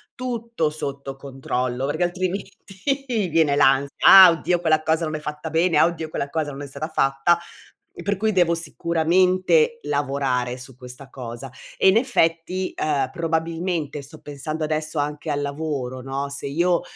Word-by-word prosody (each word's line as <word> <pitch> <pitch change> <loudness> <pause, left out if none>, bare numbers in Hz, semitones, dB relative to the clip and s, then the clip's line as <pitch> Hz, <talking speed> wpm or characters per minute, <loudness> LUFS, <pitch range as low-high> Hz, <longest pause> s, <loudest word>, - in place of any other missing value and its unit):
tutto 235 - -2
sotto 140 -2 -6
controllo, 130 -2 -3
perché 145 +5 -1
altrimenti 185 +2 -2 0.8
viene 155 -3 +3
l'ansia: 140 0 +3
"Ah, 190 -2 +10
oddio 170 +2 0
quella 155 -2 +2
cosa 160 +1 +1
non 155 0 -3
è - - -3
fatta 150 +1 -6
bene; 165 +2 +2
ah - - +6
oddio 165 -2 -3
quella 140 -2 -3
cosa 155 -1 -2
non 140 - -8
è 145 - -6
stata 140 +3 -5
fatta;" 135 +5 +2 0.5
e - - -11
per 200 0 0
cui 220 +2 +1
devo 175 -4 +3
sicuramente 170 - +2
lavorare 135 -4 -1
su 130 0 -12
questa 125 +2 -11
cosa. 125 0 -8 0.3
E - - +5
in 190 - +4
effetti, 185 -6 0
ehm, 140 -4 -1
probabilmente 165 -1 -2
sto 135 - -10
pensando 150 +2 -5
adesso 155 0 -2
anche 150 +2 -3
al 145 -1 -1
lavoro, 140 -3 -4
no, 135 +2 -4
se 140 0 -5
io, 170 +4 +1
155 Hz, 165 wpm, -23 LUFS, 140-170 Hz, 0.8 s, Ah